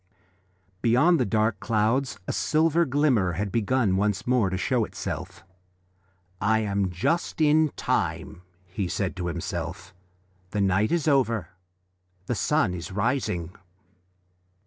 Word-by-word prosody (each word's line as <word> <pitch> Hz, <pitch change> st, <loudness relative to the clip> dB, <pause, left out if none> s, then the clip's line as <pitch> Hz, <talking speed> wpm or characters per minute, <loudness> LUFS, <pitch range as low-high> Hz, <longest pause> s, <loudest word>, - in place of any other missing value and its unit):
Beyond 145 Hz, +9 st, +4 dB
the 125 Hz, -, +1 dB
dark 110 Hz, -1 st, +1 dB
clouds 110 Hz, +2 st, 0 dB
a -, -, -1 dB
silver 165 Hz, +2 st, +2 dB
glimmer 130 Hz, -, +2 dB
had 100 Hz, +4 st, -3 dB
begun 115 Hz, -2 st, +1 dB
once 105 Hz, 0 st, 0 dB
more 125 Hz, -6 st, +2 dB
to 95 Hz, -, -2 dB
show 120 Hz, +4 st, +1 dB
itself. 95 Hz, -2 st, -6 dB, 1.0 s
"I 110 Hz, +2 st, +2 dB
am 100 Hz, -2 st, 0 dB
just 165 Hz, -, -1 dB
in 155 Hz, 0 st, +4 dB
time," 85 Hz, -, -2 dB, 0.2 s
he 95 Hz, +1 st, -4 dB
said 95 Hz, +1 st, -2 dB
to 90 Hz, -1 st, -3 dB
himself, 85 Hz, +2 st, -5 dB, 0.6 s
"the 105 Hz, -, -3 dB
night 100 Hz, +2 st, +2 dB
is 170 Hz, -2 st, 0 dB
over, 115 Hz, -, +2 dB, 0.8 s
the 120 Hz, -, -1 dB
sun 120 Hz, -3 st, +1 dB
is 90 Hz, +3 st, -6 dB
rising." 100 Hz, -5 st, -1 dB
105 Hz, 125 wpm, -26 LUFS, 95-130 Hz, 1.0 s, Beyond